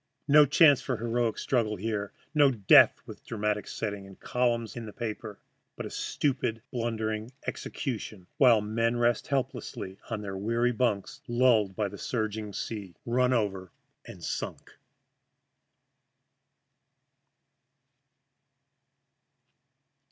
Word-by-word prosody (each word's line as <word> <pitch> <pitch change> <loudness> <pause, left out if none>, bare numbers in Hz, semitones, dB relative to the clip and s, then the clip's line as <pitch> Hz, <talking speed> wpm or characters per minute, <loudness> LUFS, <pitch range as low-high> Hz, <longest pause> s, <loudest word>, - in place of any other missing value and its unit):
No 150 0 +7
chance 145 -2 +6
for 130 -1 -2
heroic 115 0 0
struggle 115 -5 0
here, 105 0 -3 0.2
no 145 -2 +6
death 105 -7 +6
with - - -11
dramatic 105 -2 -2
setting 100 -2 -4
and 95 - -14
columns 120 -2 0
in 115 -2 -6
the 105 - -9
papers, 110 -2 -5 0.4
but - - -6
a - - -7
stupid, 125 -5 -1
blundering 110 -2 -2
execution 110 - -5
while 120 -5 +6
the 105 - -6
men 115 +2 +1
rest 120 -1 +1
helpless 135 -1 -2 0.3
on 100 -4 -4
weary 120 +2 +2
bunks, 110 -5 -1
lulled 120 -5 +3
by 105 0 0
the 100 +1 -9
surging 110 -3 -3
sea 100 -2 -5
"run 125 +2 +2
over 95 -7 -1 0.3
and - - -11
sunk." - - -5
115 Hz, 115 wpm, -29 LUFS, 105-125 Hz, 0.4 s, No